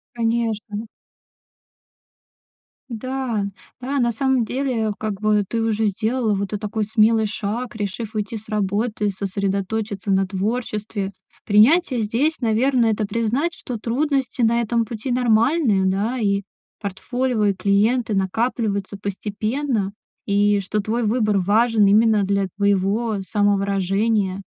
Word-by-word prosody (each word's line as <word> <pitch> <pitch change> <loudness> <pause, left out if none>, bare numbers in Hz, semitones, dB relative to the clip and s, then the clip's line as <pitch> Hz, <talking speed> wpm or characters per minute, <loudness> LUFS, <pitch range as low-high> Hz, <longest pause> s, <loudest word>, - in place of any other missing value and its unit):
Конечно. 225 -2 -1 2.0
Да 245 -2 -2 0.3
да, 270 +2 -2
на 235 -1 +2
самом 260 +1 +1
деле, 245 -3 -1
как 215 -3 -3
бы 210 -1 +3
ты 230 +3 -1
уже 225 -1 +1
сделала 220 +3 0
вот 200 0 -1
этот 210 - -3
такой 215 +1 -2
смелый 220 +1 +3
шаг, 215 +3 -4
решив 215 +2 -4
уйти 215 +1 -2
с 215 - -12
работы, 210 +1 0
сосредоточиться 200 +1 -2
на 190 0 +2
творчестве. 205 0 -3 0.3
Принятие 250 - +4
здесь, 250 +10 0
наверное, 235 0 +2
это 215 0 -1
признать, 230 +10 -1
что 250 -6 -6
трудности 265 +3 -1
на 235 +1 +3
этом 230 0 0
пути 225 +3 -5
нормальные, 235 - +3
да, 205 +7 0
и 200 -2 +1 0.4
портфолио, 230 +3 -1
и 200 - +3
клиенты 215 +5 +1
накапливаются 200 0 -1
постепенно, 210 +3 -2 0.3
и 205 0 +3
что 200 +2 -2
твой 225 +4 -1
выбор 215 -2 +2
важен 215 +3 +3
именно 215 0 +4
для 200 0 0
твоего 200 +2 +1
самовыражения. 200 0 +1
215 Hz, 120 wpm, -22 LUFS, 200-235 Hz, 2.0 s, Принятие